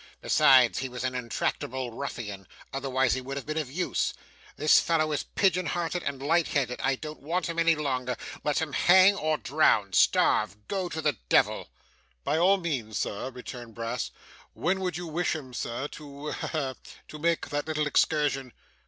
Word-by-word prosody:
Besides, 130 Hz, -3 st, +5 dB
he 135 Hz, -1 st, -3 dB
was 125 Hz, 0 st, -6 dB
an 130 Hz, 0 st, -1 dB
intractable 125 Hz, +1 st, -2 dB
ruffian; 105 Hz, -7 st, -6 dB, 0.3 s
otherwise 130 Hz, -2 st, +1 dB
he 130 Hz, -, -2 dB
would 135 Hz, +2 st, -6 dB
have 140 Hz, -, -5 dB
been 155 Hz, +1 st, -2 dB
of 140 Hz, -5 st, -4 dB
use. 180 Hz, +5 st, -1 dB, 0.4 s
This 150 Hz, -, +6 dB
fellow 155 Hz, -2 st, +1 dB
is 150 Hz, -, 0 dB
pigeon 185 Hz, -3 st, +1 dB
hearted 175 Hz, 0 st, -2 dB
and 135 Hz, -1 st, -4 dB
light 165 Hz, +3 st, +2 dB
headed. 125 Hz, -4 st, -1 dB
I 135 Hz, 0 st, +2 dB
don't 155 Hz, +3 st, -8 dB
want 165 Hz, +5 st, -1 dB
him 170 Hz, 0 st, -3 dB
any 165 Hz, 0 st, +4 dB
longer. 130 Hz, -4 st, -2 dB, 0.3 s
Let 150 Hz, -, 0 dB
him 150 Hz, -3 st, -5 dB
hang 190 Hz, +2 st, +6 dB
or 155 Hz, -4 st, 0 dB
drown 120 Hz, -11 st, +2 dB
starve 105 Hz, +3 st, +3 dB
go 190 Hz, -3 st, -2 dB
to 160 Hz, -1 st, -4 dB
the 150 Hz, -, +1 dB
devil.' -, -, +2 dB, 0.5 s
'By 155 Hz, -, +1 dB
all 190 Hz, +3 st, +5 dB
means, 130 Hz, -, -3 dB
sir,' 105 Hz, +6 st, -3 dB
returned 125 Hz, -3 st, -9 dB
Brass. 115 Hz, 0 st, -3 dB, 0.4 s
'When 185 Hz, +3 st, 0 dB
would 180 Hz, -3 st, -2 dB
you 175 Hz, -, -5 dB
wish 170 Hz, +2 st, -1 dB
him, 130 Hz, -5 st, -8 dB
sir, 120 Hz, +3 st, -3 dB
to 145 Hz, 0 st, -8 dB
ha, -, -, -4 dB
ha! 140 Hz, -5 st, -2 dB, 0.3 s
to 150 Hz, -, -9 dB
make 170 Hz, +1 st, 0 dB
that 145 Hz, +1 st, -2 dB
little 155 Hz, -1 st, 0 dB
excursion? 145 Hz, -4 st, +1 dB
145 Hz, 180 wpm, -28 LUFS, 130-165 Hz, 0.5 s, This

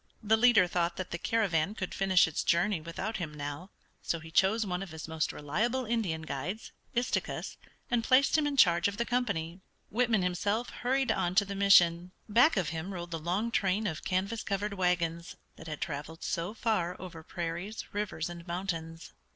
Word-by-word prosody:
The 220 Hz, +1 st, +4 dB
leader 225 Hz, -4 st, +6 dB
thought 175 Hz, -1 st, 0 dB
that 185 Hz, -, -5 dB
the 170 Hz, -, -3 dB
caravan 200 Hz, -4 st, +1 dB
could 185 Hz, -5 st, -4 dB
finish 190 Hz, -2 st, +4 dB
its 160 Hz, -, -2 dB
journey 175 Hz, +1 st, +2 dB
without 190 Hz, +7 st, -4 dB
him 170 Hz, -4 st, -4 dB
now, 145 Hz, +5 st, -6 dB, 0.3 s
so 170 Hz, -, -2 dB
he 160 Hz, 0 st, -11 dB
chose 205 Hz, +6 st, +3 dB
one 180 Hz, -1 st, -2 dB
of 195 Hz, -, -6 dB
his 160 Hz, 0 st, -7 dB
most 160 Hz, -1 st, -1 dB
reliable 235 Hz, -, -1 dB
Indian 210 Hz, -9 st, -1 dB
guides, 160 Hz, +9 st, -5 dB, 0.2 s
Istikus, 245 Hz, +1 st, -1 dB, 0.4 s
and 240 Hz, -1 st, +2 dB
placed 260 Hz, +3 st, +4 dB
him 305 Hz, -2 st, +3 dB
in 285 Hz, -1 st, -2 dB
charge 170 Hz, -5 st, +5 dB
of 200 Hz, 0 st, -4 dB
the 235 Hz, -, 0 dB
company. 200 Hz, -9 st, -1 dB, 0.3 s
Whitman 225 Hz, -3 st, +2 dB
himself 205 Hz, +6 st, -1 dB
hurried 265 Hz, +2 st, 0 dB
on 175 Hz, +1 st, 0 dB
to 200 Hz, -, +5 dB
the 200 Hz, -, -5 dB
mission. 180 Hz, -3 st, +5 dB
Back 235 Hz, +6 st, +5 dB
of 180 Hz, -5 st, +1 dB
him 165 Hz, +4 st, -4 dB
rolled 175 Hz, 0 st, -6 dB
the 165 Hz, -, -3 dB
long 185 Hz, +8 st, -1 dB
train 200 Hz, 0 st, +1 dB
of 160 Hz, -6 st, -3 dB
canvas 195 Hz, +4 st, -1 dB
covered 200 Hz, +1 st, -2 dB
wagons 170 Hz, -3 st, -1 dB, 0.2 s
that 160 Hz, -, -12 dB
had 155 Hz, -2 st, -6 dB
traveled 155 Hz, +1 st, -5 dB
so 170 Hz, +6 st, -2 dB
far 185 Hz, -7 st, -1 dB
over 170 Hz, -3 st, -8 dB
prairies, 175 Hz, +6 st, -5 dB
rivers, 200 Hz, -6 st, -2 dB
and 175 Hz, 0 st, -9 dB
mountains. 165 Hz, -2 st, -4 dB
185 Hz, 185 wpm, -30 LUFS, 170-215 Hz, 0.4 s, leader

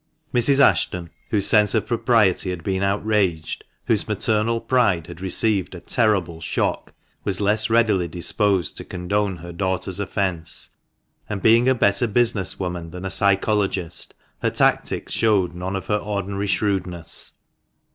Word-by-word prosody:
Mrs. 130 Hz, +3 st, +3 dB
Ashton, 90 Hz, -10 st, +2 dB, 0.2 s
whose 100 Hz, -3 st, +1 dB
sense 105 Hz, -2 st, +5 dB
of -, -, +1 dB
propriety 115 Hz, -6 st, +2 dB
had 90 Hz, -2 st, -5 dB
been 95 Hz, +1 st, -1 dB
outraged, 100 Hz, -5 st, 0 dB, 0.2 s
whose -, -, +1 dB
maternal 115 Hz, +1 st, 0 dB
pride 110 Hz, -11 st, +1 dB
had 85 Hz, 0 st, -11 dB
received 95 Hz, 0 st, 0 dB
a -, -, -7 dB
terrible 95 Hz, -7 st, 0 dB
shock, 75 Hz, -, -2 dB, 0.3 s
was 95 Hz, -3 st, -2 dB
less 105 Hz, +2 st, +2 dB
readily 110 Hz, -6 st, +3 dB
disposed 90 Hz, +1 st, 0 dB
to -, -, -5 dB
condone 95 Hz, +1 st, -2 dB
her 85 Hz, +1 st, -9 dB
daughter's 95 Hz, +1 st, -2 dB
offence; 95 Hz, -4 st, -2 dB, 0.6 s
and, 105 Hz, -2 st, -4 dB
being 115 Hz, +3 st, +5 dB
a 130 Hz, -, +3 dB
better 100 Hz, +1 st, +2 dB
business 115 Hz, -3 st, +1 dB
woman 90 Hz, -3 st, -4 dB
than 90 Hz, +3 st, -8 dB
a 95 Hz, -, -3 dB
psychologist, 100 Hz, -3 st, +1 dB, 0.3 s
her -, -, +2 dB
tactics -, -, 0 dB
showed 100 Hz, -6 st, +2 dB
none 90 Hz, +2 st, -4 dB
of 95 Hz, -, -4 dB
her 105 Hz, -, +1 dB
ordinary 100 Hz, -1 st, -3 dB
shrewdness. 90 Hz, -3 st, -2 dB
100 Hz, 145 wpm, -22 LUFS, 90-105 Hz, 0.6 s, sense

